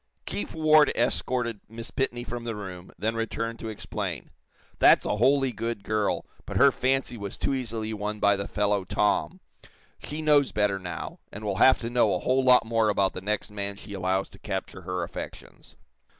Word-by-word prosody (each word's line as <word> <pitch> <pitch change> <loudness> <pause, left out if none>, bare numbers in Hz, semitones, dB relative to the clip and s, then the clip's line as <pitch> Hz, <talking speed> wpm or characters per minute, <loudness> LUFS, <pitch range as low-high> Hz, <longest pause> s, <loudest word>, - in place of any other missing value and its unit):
Chief 100 - -4
Ward 155 -2 +5
escorted 120 -2 0
Miss 115 +1 -7
Pitney 120 -2 -2
from 120 0 -5
the 115 -2 -3
room, 95 -3 -8
then 110 +2 -1
returned 115 0 -3
to 115 - -6
explain: 110 - -5 0.5
"That's - - +6
a - - 0
wholly 135 +3 +3
good 115 -2 -4
girl, 105 -1 0 0.2
but - - -3
her - - +7
fancy 130 -2 0
was 100 -2 -6
too - - 0
easily 115 -4 -3
won 105 0 -3
by 100 -1 +4
the 100 0 -4
fellow, 105 -1 +1
'Tom.' 105 - 0 0.6
She 155 +2 -6
knows 145 -3 +4
better, 105 -2 +1
now, 90 -2 -6
and 105 - -8
will 100 -3 -2
have 130 - +6
to 115 - -3
know 115 -5 +3
a - - -1
whole 130 +1 +2
lot 125 -2 +6
more 115 -1 +2
about 100 -2 +2
the 95 - -6
next 105 +2 -2
man 100 -1 -4
she 100 +1 -10
allows 95 0 0
to - - -15
capture 90 - -5
her 90 0 -3
affections. - - -9
110 Hz, 190 wpm, -27 LUFS, 100-125 Hz, 0.6 s, her